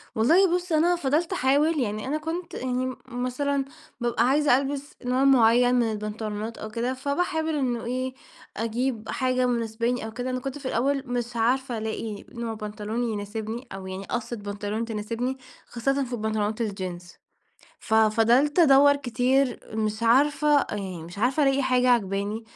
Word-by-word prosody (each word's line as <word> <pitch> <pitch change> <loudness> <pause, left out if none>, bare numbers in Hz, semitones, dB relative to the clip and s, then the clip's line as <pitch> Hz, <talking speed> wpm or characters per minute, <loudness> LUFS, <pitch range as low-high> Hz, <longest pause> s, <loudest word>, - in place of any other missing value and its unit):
والله 345 - +4
بُصّ، 360 -1 -3
أنا 335 +3 +3
فضلت 325 +3 0
أحاول، 295 +1 +2
يعني 215 -2 -2
أنا 295 +3 0
كنت 330 +3 -5
يعني 255 0 -2
م 255 0 -4
مثلًا، 265 +3 -1 0.4
بابقى 240 -1 +1
عايزة 285 -1 +4
ألبس 280 +1 -4
نوع 255 +2 +2
معين 245 -2 +5
من 235 -2 +2
البنطلونات 215 +1 -4
أو 215 - -6
كده، 235 +4 -2
فباحاول 315 +4 -1
إنه 245 -5 -1
إيه 255 +2 -2 0.4
أجيب 230 0 -2
حاجة 255 -1 +1
مناسباني 235 0 -1
أو 220 - -6
كده. 250 +2 -4
أنا 255 0 -2
كنت 270 +2 -5
في 275 -2 -6
الأول 270 +3 0
مش 240 -1 -3
عارفة 245 +1 +1
ألاقي 220 -1 -4
نوع 235 -1 -5
بنطلون 215 +2 -4
يناسبني، 220 +2 -4
أو 190 -1 -7
يعني 190 +1 -6
قَصّة 240 0 -3
بنطلون 205 +1 -4
تناسبني، 230 +4 -3 0.3
خاصةً 275 +4 -1
في 245 - -8
البنطلونات 215 0 -1
الجينز، 185 -5 -5 0.7
ففضلت 225 +7 +3
أدوّر 285 -2 +7
كتير، 255 0 +1
مش 215 0 -2
عارفة، 290 +4 +4
يعني 190 -5 -5
مش 175 +4 -10
عارفة 255 +6 +2
ألاقي 275 0 +3
حاجة 255 -1 +2
عاجباني، 205 -1 0
245 Hz, 155 wpm, -26 LUFS, 220-275 Hz, 0.7 s, أدوّر